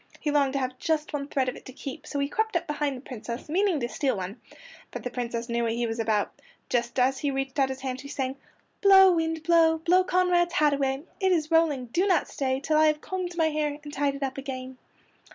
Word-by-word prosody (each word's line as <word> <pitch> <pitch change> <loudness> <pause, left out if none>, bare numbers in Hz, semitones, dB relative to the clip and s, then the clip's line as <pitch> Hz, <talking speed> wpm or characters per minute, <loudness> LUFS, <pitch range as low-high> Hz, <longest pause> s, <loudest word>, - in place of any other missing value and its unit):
He 300 - -1
longed 280 -2 +2
to 275 - 0
have 255 -1 -3
just 310 -2 -1
one 280 -1 -3
thread 270 -3 0
of 255 - -2
it - - -12
to - - -9
keep, 275 +2 -8
so 285 - -4
he 280 0 +1
crept 440 +6 -1
up 345 - -4
behind 295 -3 -2
the - - -10
Princess, 240 -2 -7
meaning 360 +1 +1
to 240 - -1
steal 250 +1 -1
one. 190 +5 -6 0.5
But - - -7
the 250 - -4
Princess 235 -1 -3
knew 235 -1 -1
what 230 -1 0
he 235 +1 -1
was 225 0 -3
about. 215 -2 0 0.4
Just 240 0 -1
as 260 +1 +2
he 290 - 0
reached 270 0 -3
out 270 -1 +3
his 265 0 -5
hand 260 -1 -4
she 280 - -9
sang: 265 -2 -3 0.5
"Blow, 385 -2 +8
wind, 325 -2 -1
blow! 325 -1 +4
Blow 355 +3 +3
Conrad's 360 -1 +2
hat 300 -2 +4
away. 270 0 -1 0.2
It 380 -2 +2
is 320 -3 +1
rolling! 315 -6 +3
Do 345 +12 0
not 360 -5 +2
stay 265 -1 -1
Till 305 +2 +1
I 310 - +6
have 305 0 +2
combed 360 -2 -4
my 320 -1 +3
hair 300 -1 -1
And 295 -1 -9
tied 280 0 0
it 280 - -5
up 270 0 -3
again." 260 -1 -7
280 Hz, 245 wpm, -27 LUFS, 255-325 Hz, 0.5 s, Blow